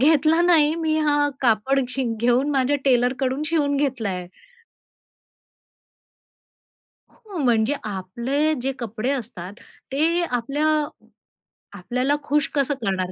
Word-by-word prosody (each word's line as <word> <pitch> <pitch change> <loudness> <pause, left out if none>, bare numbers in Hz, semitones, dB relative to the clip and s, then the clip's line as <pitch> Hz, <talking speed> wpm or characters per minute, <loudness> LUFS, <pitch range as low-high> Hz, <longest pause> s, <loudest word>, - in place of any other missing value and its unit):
घेतला 310 +3 +4
नाही, 320 -3 +4
मी 320 -2 0
हा, 290 -1 +2
कापड 255 +3 +2
शि 265 +1 -2 0.2
घेऊन 245 +4 +2
माझ्या 275 0 +2
टेलरकडून 255 +2 +1
शिवून 295 -3 +1
घेतलाय." 225 -10 -2 2.9
हो. 425 -6 -11
म्हणजे 240 -2 +2
आपले 235 +10 -1
जे 270 +2 -1
कपडे 235 +1 -3
असतात, 200 -8 -5 0.4
ते 325 +5 +2
आपल्या 275 +2 -1 1.1
आपल्याला 250 +9 0
खुश 295 0 +1
कसं 285 0 +1
करणार? 185 -3 -1
270 Hz, 105 wpm, -23 LUFS, 235-295 Hz, 2.9 s, घेतला